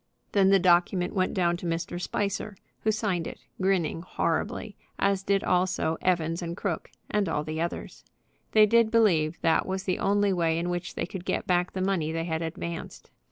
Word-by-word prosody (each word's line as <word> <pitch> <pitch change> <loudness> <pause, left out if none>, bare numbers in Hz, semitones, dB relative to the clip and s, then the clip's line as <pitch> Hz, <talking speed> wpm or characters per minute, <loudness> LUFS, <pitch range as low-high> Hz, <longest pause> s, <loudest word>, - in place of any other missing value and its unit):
Then 195 -2 +4
the 195 - +6
document 180 0 +3
went 185 -3 +1
down 175 -2 +2
to 175 - -5
Mr. 170 +1 -3
Spicer, 200 +2 -2 0.2
who 220 - +1
signed 195 -6 -1
it, - - -7 0.2
grinning 185 -4 +1
horribly; 200 +4 -2 0.2
as 200 -1 +1
did 195 0 +1
also 180 -3 +1
Evans 170 -2 +1
& - - -5
Crooke 175 -6 -3 0.2
and 205 -4 +1
all 150 -2 -1
the 155 +1 -3
others. 170 - -5 0.5
They 215 -1 +7
did 230 +1 +4
believe 175 -9 +3
that 165 -1 +2
was 190 0 -2
the 185 -2 -1
only 200 0 +2
way 165 -2 +1
in 175 +1 -1
which 175 0 -4
they - - -1
could 180 +1 -7
get - - -1
back 180 0 +1
the 185 - -3
money 185 -5 0
they 165 0 -2
had 160 -1 -2
advanced. 165 +1 -6
180 Hz, 190 wpm, -27 LUFS, 165-195 Hz, 0.5 s, They